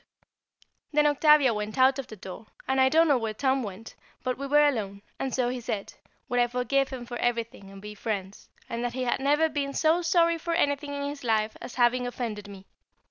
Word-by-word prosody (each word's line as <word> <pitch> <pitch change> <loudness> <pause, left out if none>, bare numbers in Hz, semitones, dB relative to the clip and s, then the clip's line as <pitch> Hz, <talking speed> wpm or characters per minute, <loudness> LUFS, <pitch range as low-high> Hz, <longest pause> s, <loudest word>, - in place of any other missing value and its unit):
[Sidenote: - - -46
Forgiveness] - - -36
Then 295 0 +4 0.2
Octavia 280 -5 +6
went 210 +3 -4
out 260 +1 +4
of 270 - -5
the 215 - -9
other 195 - -25
door, 190 +4 -9 0.2
and 265 0 +2
I 260 - +5
don't 325 +3 +4
know 280 -4 +3
where 220 -2 -3
Tom 265 +2 +1
went, 210 0 -8 0.3
but 255 -1 -1
we 275 +1 -5
were 295 +1 +5
alone, 200 -7 -3 0.2
and 270 - -2
so 250 -1 0
he 250 0 -4
said, 210 -3 -4 0.3
would 245 -2 0
I 240 - +4
forgive 250 +3 0
him 255 -3 -7
for 240 0 -6
everything 230 -5 -2
and 195 0 -11
be 210 +1 -8
friends, 200 -2 -5 0.2
that 235 +1 -3
he 255 0 -2
had 245 - 0
never 295 +4 +3
been 285 -2 -3
so 325 +2 +3
sorry 335 -1 +2
for 335 +1 -2
anything 285 -2 0
in 280 - -3
his 285 -1 -7
life 220 -2 0
as - - -8
having 245 0 +2
offended 225 -4 -5
me. 195 -1 -11
250 Hz, 230 wpm, -27 LUFS, 220-280 Hz, 0.3 s, Octavia